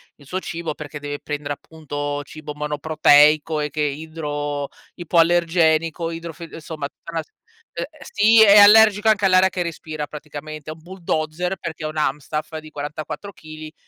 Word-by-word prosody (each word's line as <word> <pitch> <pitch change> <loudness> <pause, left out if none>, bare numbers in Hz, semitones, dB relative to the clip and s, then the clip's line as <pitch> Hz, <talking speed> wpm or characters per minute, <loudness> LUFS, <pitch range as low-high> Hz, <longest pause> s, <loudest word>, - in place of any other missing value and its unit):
il 145 - -19
suo 185 +6 -3
cibo, 165 -3 -5
perché 150 -1 -8
deve 145 0 -5
prendere, 145 -1 -4
appunto, 145 -2 -5
cibo 150 +1 -9
monoproteico 150 +1 +3
e 150 - -2
che 150 0 -1
è - - 0
idro 145 -1 -4 0.3
ipoallergenico 165 -1 +2
idro 165 0 -7
f 170 +2 -9
insomma 155 -2 -6
tutta 170 - -13
una 165 - -2
se - - -32 0.4
ehm, - - -3 0.2
sì, 220 0 +4
è 205 0 +7
allergico 210 +1 +7
anche 215 -2 +3
all'aria 185 0 +5
che 180 -1 -2
respira 155 -2 -5
praticamente, 150 0 -9
è - - -4
un 160 - -18
bulldozer 175 0 -3
perché 165 -1 -6
è - - 0
un 155 - -7
Amstaff 150 +2 -2
di 155 0 -10
44 155 +7 -6
chili 155 -3 -11
155 Hz, 170 wpm, -21 LUFS, 150-170 Hz, 0.4 s, è